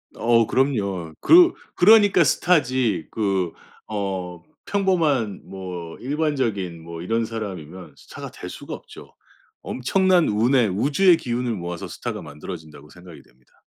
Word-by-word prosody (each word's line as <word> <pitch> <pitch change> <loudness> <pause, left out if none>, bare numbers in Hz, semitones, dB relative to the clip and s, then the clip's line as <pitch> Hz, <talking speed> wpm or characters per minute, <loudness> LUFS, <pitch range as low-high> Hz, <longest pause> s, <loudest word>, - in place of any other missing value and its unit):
어. 115 -1 +3
그럼요. 100 - -1
그 350 +1 +7 0.2
그러니까 205 -2 +6
스타지 130 - +1
그 95 -5 -1 0.4
어. 95 -4 -4 0.3
평범한 160 - +1
뭐 90 -3 -7
일반적인 125 - -2
뭐 85 0 -8
이런 115 +5 0
사람이면 95 -6 -7
스타가 - - -10
될 - - -9
수가 - - -8
없죠. - - -12 0.5
엄청난 180 +6 +2
운의 115 +3 +3
우주의 150 - +3
기운을 120 -3 -2
모아서 85 -3 -5
스타가 - - -6
만들어진다고 75 -1 -10
생각이 90 -2 -14
됩니다. 65 +1 -30
110 Hz, 290 characters per minute, -23 LUFS, 90-140 Hz, 0.5 s, 그